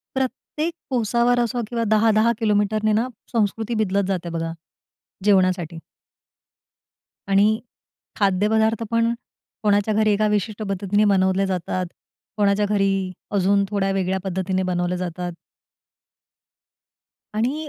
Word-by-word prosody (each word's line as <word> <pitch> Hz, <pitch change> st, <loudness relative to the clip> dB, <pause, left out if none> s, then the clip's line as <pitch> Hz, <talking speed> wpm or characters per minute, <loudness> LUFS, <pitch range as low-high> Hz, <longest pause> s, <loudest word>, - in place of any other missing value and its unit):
प्रत्येक 265 Hz, +5 st, -2 dB, 0.2 s
कोसावर 240 Hz, 0 st, +2 dB
असो 240 Hz, +1 st, 0 dB
किंवा 235 Hz, -1 st, -1 dB
10-10 220 Hz, +1 st, +4 dB
किलोमीटरने 215 Hz, 0 st, +1 dB
ना 225 Hz, +4 st, +1 dB, 0.2 s
संस्कृती 225 Hz, 0 st, 0 dB
बदलत 200 Hz, 0 st, 0 dB
जाते 180 Hz, -3 st, -2 dB
बघा, 165 Hz, 0 st, -3 dB, 0.7 s
जेवणासाठी. 185 Hz, -4 st, +2 dB, 1.5 s
आणि 200 Hz, +1 st, +5 dB, 0.7 s
खाद्यपदार्थ 220 Hz, +3 st, +2 dB
पण 230 Hz, 0 st, +2 dB, 0.5 s
कोणाच्या 205 Hz, +1 st, +2 dB
घरी 215 Hz, 0 st, +3 dB
एका 215 Hz, +1 st, +2 dB
विशिष्ट 210 Hz, +1 st, -3 dB
पद्धतीने 200 Hz, +1 st, +1 dB
बनवले 190 Hz, 0 st, +2 dB
जातात. 185 Hz, 0 st, -2 dB, 0.5 s
कोणाच्या 205 Hz, 0 st, +3 dB
घरी 200 Hz, -1 st, +2 dB, 0.5 s
अजून 200 Hz, +1 st, +3 dB
थोड्या 195 Hz, -1 st, 0 dB
वेगळ्या 190 Hz, 0 st, 0 dB
पद्धतीने 190 Hz, 0 st, -1 dB
बनवले 180 Hz, 0 st, -1 dB
जातात. 180 Hz, 0 st, -4 dB, 2.0 s
आणि 270 Hz, +8 st, -1 dB
205 Hz, 105 wpm, -22 LUFS, 190-220 Hz, 2.0 s, आणि